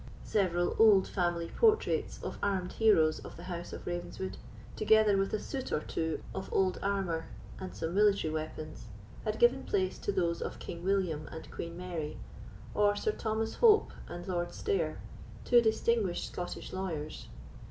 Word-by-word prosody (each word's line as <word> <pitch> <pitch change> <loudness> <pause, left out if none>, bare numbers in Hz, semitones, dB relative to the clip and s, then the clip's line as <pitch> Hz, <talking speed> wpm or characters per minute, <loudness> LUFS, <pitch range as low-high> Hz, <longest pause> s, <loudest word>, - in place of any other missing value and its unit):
Several 175 -4 +1
old 210 -4 +7
family 175 -2 -1
portraits 440 -2 +2
of - - -5
armed 190 -3 0
heroes 165 -9 +4
of - - -10
the 170 - -9
house 175 -1 -5
of - - -8
Ravenswood, 175 +2 -4 0.4
together 215 -1 +5
with 195 0 +1
a - - +1
suit 265 +5 -5
or - - +2
two 160 0 -2
of 190 - -5
old 190 -1 +2
armour 190 -5 -1 0.3
and 185 - -6
some 160 +1 -3
military 200 -5 +3
weapons, 155 -4 -5 0.4
had 215 0 -1
given 245 +3 +4
place 185 -2 0
to - - -1
those 175 -3 0
of - - -4
King 170 0 -7
William 180 -6 0
and 160 - -9
Queen 170 0 -6
Mary, 170 -4 -4 0.6
or 205 0 +3
Sir 435 - 0
Thomas 220 - -2
Hope 445 -3 +6 0.2
and 175 +2 -7
Lord 175 -2 -2
Stair, 410 -1 -1 0.5
two 240 -1 +6
distinguished 220 -4 +1
Scottish 175 - -5
lawyers. 165 -5 -4
190 Hz, 160 wpm, -32 LUFS, 170-215 Hz, 0.6 s, old